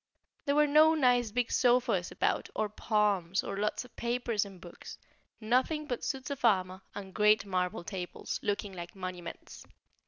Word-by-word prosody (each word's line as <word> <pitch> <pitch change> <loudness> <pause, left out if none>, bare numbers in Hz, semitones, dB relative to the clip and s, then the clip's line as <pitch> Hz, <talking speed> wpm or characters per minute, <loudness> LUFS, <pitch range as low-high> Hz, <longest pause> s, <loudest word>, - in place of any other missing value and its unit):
There 280 -1 +1
were 300 0 +5
no 310 +2 +6
nice 245 -5 +3
big 245 +2 -1
sofas 245 -8 +2
about, - - 0
or 215 -1 0
palms, 205 -4 +1
or - - -4
lots 210 +4 -1
of 250 - -18
papers 235 -3 -1
and 195 -2 -12
books; 175 0 -11 0.4
nothing 255 +7 +1
but 245 -5 -4
suits 270 0 -3
of 280 - -5
armour 185 -2 +2
and 195 -2 -7
great 210 -1 +4
marble 180 -2 -1
tables, 180 -1 -5
looking 205 -1 -2
like 175 0 -8
monuments. 185 -2 -7
210 Hz, 160 wpm, -31 LUFS, 190-250 Hz, 0.4 s, no